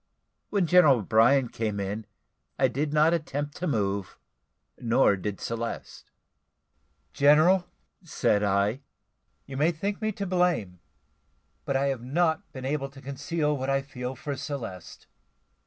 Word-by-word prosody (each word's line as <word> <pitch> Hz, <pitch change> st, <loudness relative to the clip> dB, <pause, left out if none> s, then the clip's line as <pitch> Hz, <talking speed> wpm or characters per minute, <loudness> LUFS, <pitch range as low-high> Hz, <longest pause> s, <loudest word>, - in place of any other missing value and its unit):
When 200 Hz, -4 st, +1 dB
General 165 Hz, -5 st, +6 dB
O'Brien 115 Hz, +5 st, +3 dB
came 105 Hz, -3 st, -3 dB
in, 100 Hz, +2 st, -4 dB, 0.5 s
I -, -, +4 dB
did 145 Hz, +2 st, -2 dB
not 155 Hz, +2 st, +4 dB
attempt 145 Hz, -3 st, -3 dB
to 180 Hz, -, -3 dB
move, 100 Hz, -, -1 dB, 0.6 s
nor 115 Hz, -3 st, +3 dB
did 100 Hz, +1 st, -5 dB
Celeste. 115 Hz, 0 st, -5 dB, 1.0 s
"General," 155 Hz, +6 st, +5 dB, 0.4 s
said 105 Hz, -, +1 dB
I, 100 Hz, +5 st, +1 dB, 0.6 s
"you 135 Hz, -1 st, -7 dB
may 155 Hz, +4 st, +3 dB
think 200 Hz, +6 st, -4 dB
me 215 Hz, 0 st, 0 dB
to 200 Hz, -, -4 dB
blame, 175 Hz, -, 0 dB, 0.9 s
but 140 Hz, -, -1 dB
I 140 Hz, +1 st, +1 dB
have 135 Hz, -4 st, -3 dB
not 160 Hz, +7 st, 0 dB
been 130 Hz, -3 st, -8 dB
able 140 Hz, 0 st, -2 dB
to 135 Hz, 0 st, -14 dB
conceal 150 Hz, +3 st, -2 dB
what 130 Hz, -1 st, -3 dB
I 135 Hz, 0 st, +1 dB
feel 125 Hz, -2 st, -6 dB
for 145 Hz, -3 st, -5 dB
Celeste. 115 Hz, -, -7 dB
140 Hz, 140 wpm, -27 LUFS, 115-155 Hz, 1.0 s, General